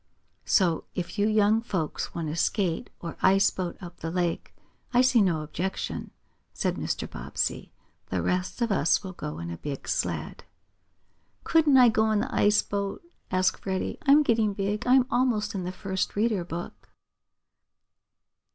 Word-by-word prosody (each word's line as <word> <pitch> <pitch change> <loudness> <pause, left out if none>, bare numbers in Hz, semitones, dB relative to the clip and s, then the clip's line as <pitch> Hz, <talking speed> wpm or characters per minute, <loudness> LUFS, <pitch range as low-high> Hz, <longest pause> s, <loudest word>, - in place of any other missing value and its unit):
"So 175 -5 +2
if 180 +4 -4
you 205 - +3
young 215 +1 +3
folks 185 -9 -3
want 165 -2 -3
to 155 - -3
skate 175 -1 0
or 170 -1 -6
ice 195 +1 +5
boat 180 -2 -4
up 175 -2 -10
the 165 - -5
lake 175 -1 -2 0.4
I 245 - +7
see 250 -3 +4
no 170 -6 +1
objection," 180 +5 -4 0.4
said - - -1
Mr. - - -3
Bobbsey. - - -3 0.4
"The - - -2
rest 180 +6 -1
of 230 - 0
us 175 0 +2
will 190 -1 -6
go 75 - -6
in 85 +1 -5
a 85 - -6
big 140 - -6
sled." - - -2 1.0
"Couldn't 310 -4 +4
I 250 -2 +8
go 220 0 +2
in 215 -1 +2
the - - -4
ice 210 +1 +4
boat?" 200 +4 -3 0.3
asked 185 0 +1
Freddie. 190 -1 -3
"I'm 295 +1 +6
getting 225 -5 +2
big. 205 +3 -2
I'm 255 0 +5
almost 235 -4 +1
in 190 -3 -3
the 180 - -3
first 190 0 -3
reader 210 -3 +1
book." 160 - -7
195 Hz, 160 wpm, -27 LUFS, 175-220 Hz, 1.0 s, I